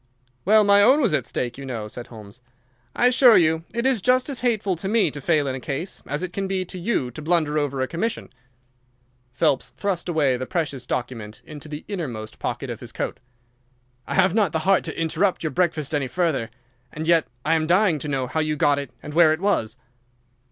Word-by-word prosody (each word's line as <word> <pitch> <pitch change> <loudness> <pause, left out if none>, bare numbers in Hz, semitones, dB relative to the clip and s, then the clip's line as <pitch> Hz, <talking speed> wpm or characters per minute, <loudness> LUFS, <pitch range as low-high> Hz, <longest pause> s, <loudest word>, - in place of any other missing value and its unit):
"Well, 215 +3 +6
my 200 0 +5
own 260 +8 +6
was 235 - +2
at 130 -5 0
stake, 120 +1 -3
you - - -7
know," 115 -5 -4
said 120 +3 -8
Holmes. 110 0 -12 0.5
"I - - +2
assure 250 -2 +7
you 160 -1 +2
it 235 +1 -2
is 260 -6 +2
just 255 +4 +2
as 265 - -3
hateful 215 -6 0
to 190 - -5
me 220 +1 +2
to 145 - -7
fail 150 0 +2
in 135 - -2
a 130 - -4
case 145 +8 -5
as 145 +5 -3
it 180 -1 -5
can 195 +1 -2
be 190 -1 -1
to 180 - -7
you 175 - -1
to 140 - -9
blunder 155 -2 +1
over 140 -2 -1
a - - -2
commission." 185 - -3 1.0
Phelps 130 +2 +1
thrust 190 -3 -2
away 145 -6 +2
the 130 +1 -5
precious 145 -8 -3
document 115 -4 -5
into 150 0 -9
the 150 0 -7
innermost 130 - -5
pocket - - -3
of - - -6
his - - -9
coat. - - -4 0.9
"I - - -3
have - - +4
not 205 -7 +2
the 160 - +1
heart 195 0 +4
to 160 - -5
interrupt 165 +4 0
your 155 - -1
breakfast 160 -1 0
any 145 -3 0
further, 145 -5 -1 0.4
and 160 +1 -5
yet 165 -2 +4 0.2
I - - +3
am 160 -1 +1
dying 180 -2 +3
to 150 - -5
know 135 -3 -1
how 130 +5 -2
you 155 -1 0
got 145 -1 +2
it 140 - -6
and 150 - -7
where 160 -1 +6
it 160 - -3
was." 175 - 0
160 Hz, 220 wpm, -23 LUFS, 135-195 Hz, 1.0 s, assure